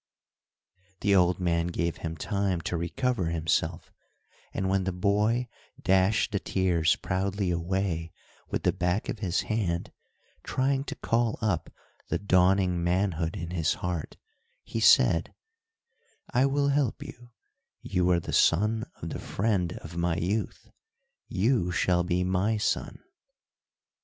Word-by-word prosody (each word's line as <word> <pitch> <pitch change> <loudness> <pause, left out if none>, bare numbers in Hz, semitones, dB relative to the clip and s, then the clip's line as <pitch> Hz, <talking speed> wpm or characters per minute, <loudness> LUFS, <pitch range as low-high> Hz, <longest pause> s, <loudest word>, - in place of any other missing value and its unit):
The 100 0 +3
old 90 -1 +3
man 85 -2 +1
gave 85 -1 -2
him 80 0 -5
time 100 -3 -1
to 85 - -3
recover 95 +5 -1
himself 80 0 -1 0.6
and 95 - -2
when 95 0 +1
the 95 - -1
boy 105 +6 +1 0.3
dashed 95 +3 +2
the 100 - 0
tears 85 -5 +1
proudly 95 0 -1
away 85 -1 -1 0.4
with - - -2
the - - +2
back 90 +4 -1
of 110 - -3
his 95 -3 0
hand, 95 -6 -2 0.5
trying 135 +1 0
to - - -5
call 115 -1 0
up 105 -7 -1 0.4
the - - +1
dawning 95 -2 +3
manhood 85 -2 0
in 85 +1 -5
his 80 -3 +1
heart, 90 -3 -4 0.5
he - - -4
said: - - +4 1.0
"I 130 +2 +4
will 140 +1 +1
help 140 -4 0
you, 120 0 -12 0.5
you 90 0 +1
are 90 -1 +4
the - - -6
son 105 +6 +3 0.2
of - - -3
the - - -5
friend 95 -5 -1
of 85 +1 -8
my 85 -1 +1
youth, 100 +7 -2 0.6
you 105 -1 +1
shall 90 0 +2
be 90 +1 0
my 95 +4 +1
son." 105 - -2
95 Hz, 135 wpm, -28 LUFS, 85-105 Hz, 1.0 s, said